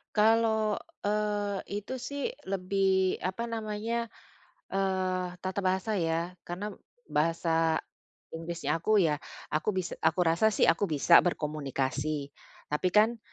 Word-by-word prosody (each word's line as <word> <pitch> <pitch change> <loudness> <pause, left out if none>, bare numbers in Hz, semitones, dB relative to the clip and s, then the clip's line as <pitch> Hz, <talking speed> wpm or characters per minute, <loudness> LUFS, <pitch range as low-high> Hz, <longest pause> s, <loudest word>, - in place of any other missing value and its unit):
Kalau, 220 -1 +3 0.2
eee, 205 -1 0 0.2
itu 210 - -7
sih 280 +3 -4 0.2
lebih, 190 0 +1
apa 190 +5 -3
namanya, 225 +2 -2 0.6
eee, 185 -1 0
tata 190 +2 -2
bahasa 190 +2 0
ya, 165 +2 -1
karena 190 +5 -4 0.4
bahasa 165 +1 +2 0.5
Inggrisnya 165 0 -2
aku, 215 +6 +2
ya 150 -3 +1 0.3
aku 170 +7 0
bis 185 -2 -2
aku 160 +3 +2
rasa 170 +5 +3
sih - - +2
aku 170 +5 +4
bisa 160 +1 +6
berkomunikasi, 145 -2 -2 0.4
tapi 150 +5 +1
kan 225 +2 +5
185 Hz, 115 wpm, -29 LUFS, 165-210 Hz, 0.6 s, bisa